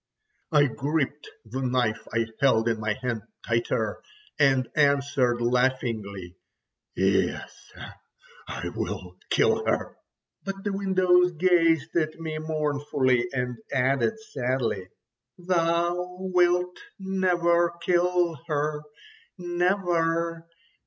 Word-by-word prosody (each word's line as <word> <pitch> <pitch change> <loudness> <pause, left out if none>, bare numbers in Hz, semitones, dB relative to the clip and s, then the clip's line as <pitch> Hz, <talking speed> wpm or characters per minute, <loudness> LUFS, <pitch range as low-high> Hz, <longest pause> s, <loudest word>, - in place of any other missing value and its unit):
I 150 -2 +5
gripped 145 +2 -2 0.2
the 125 +5 -5
knife 125 -3 0
I 115 +1 +1
held 120 -5 +3
in 115 -2 0
my 105 -1 0
hand 125 -3 -3 0.2
tighter, 115 -2 -1 0.4
and 135 -3 +3
answered 140 -4 +2
laughingly: 115 -7 -1 0.6
"Yes, - - -1 0.8
I - - -4
will 90 0 -5
kill - - +3
her." - - -1 0.5
But 195 0 -5
the 205 - -2
windows 185 -2 +3
gazed 165 -2 +2
at 155 -1 0
me 160 -1 -4
mournfully, 145 -5 0
and 125 -2 -2
added 135 - +1
sadly: 125 - -2 0.5
"Thou 175 0 0
wilt 180 -1 +1 0.2
never 175 -3 +2
kill 175 -2 +1
her. 150 0 -1 0.6
Never! 175 -2 0
150 Hz, 100 wpm, -26 LUFS, 125-175 Hz, 0.8 s, I